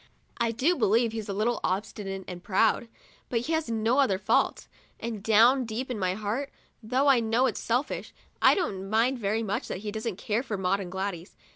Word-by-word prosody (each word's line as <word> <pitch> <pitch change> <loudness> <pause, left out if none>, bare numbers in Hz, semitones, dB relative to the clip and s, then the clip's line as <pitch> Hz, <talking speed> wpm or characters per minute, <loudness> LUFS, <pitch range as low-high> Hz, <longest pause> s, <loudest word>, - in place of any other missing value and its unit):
I 235 -1 +2
do 260 +10 +2
believe 225 - +2
he's 220 -2 -5
a - - -1
little 220 +4 0
obstinate 195 0 -3
and 180 -1 -8
proud; 220 +4 +2 0.4
but 230 -2 0
he 310 +7 -2
has 320 -5 0
no 225 +3 +1
other 210 -9 +3
faults, - - +1 0.3
and 225 -3 -4
down 230 +5 +5
deep 245 +3 -4
in 230 - -3
my 185 -1 0
heart, 215 +7 -3 0.3
though 255 +5 +1
I 270 -3 +6
know 230 +3 +2
it's - - -1
selfish, 245 +5 -2 0.3
I - - +6
don't 195 - -2
mind 235 +4 +2
very 220 +1 0
much 200 -2 -2
that 185 - -5
he 210 - -2
doesn't 220 -1 -3
care 215 +3 -1
for 220 -6 -4
Maud 190 +1 +1
and 180 -3 -6
Gladys. 190 -1 -4
220 Hz, 200 wpm, -27 LUFS, 200-245 Hz, 0.4 s, I